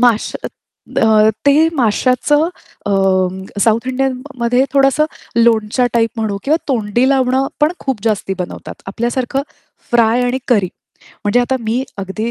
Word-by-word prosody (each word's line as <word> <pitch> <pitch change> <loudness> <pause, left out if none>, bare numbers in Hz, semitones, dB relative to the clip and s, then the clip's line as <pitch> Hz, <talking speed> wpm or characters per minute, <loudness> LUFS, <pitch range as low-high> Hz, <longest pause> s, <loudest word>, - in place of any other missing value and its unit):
माश 235 -3 +2 0.7
अ, 220 -1 +5 0.2
ते 305 +3 +5
माश्याचं 255 +4 +2 0.4
अ, - - 0 0.7
साउथ 230 +2 +2
इंडियनमध्ये 255 -1 0
थोडंसं 275 +2 +3 0.3
लोणच्या 230 +1 +3
टाइप 230 -1 +2
म्हणू 220 -3 -2
किंवा 305 +3 +3
तोंडी 240 0 +1
लावणं, 265 0 +2
पण 300 +3 +3
खूप 260 -7 -3
जास्ती 205 -3 0
बनवतात. 180 - -6
आपल्यासारखं 240 +6 -2 0.5
फ्राय 235 0 +3
आणि 245 +1 0
करी. 205 -7 +3 0.6
म्हणजे 205 +4 +3
आता 260 +2 0
मी 230 +3 -1 0.2
अगदी 195 +4 -3
240 Hz, 125 wpm, -16 LUFS, 220-265 Hz, 0.7 s, अ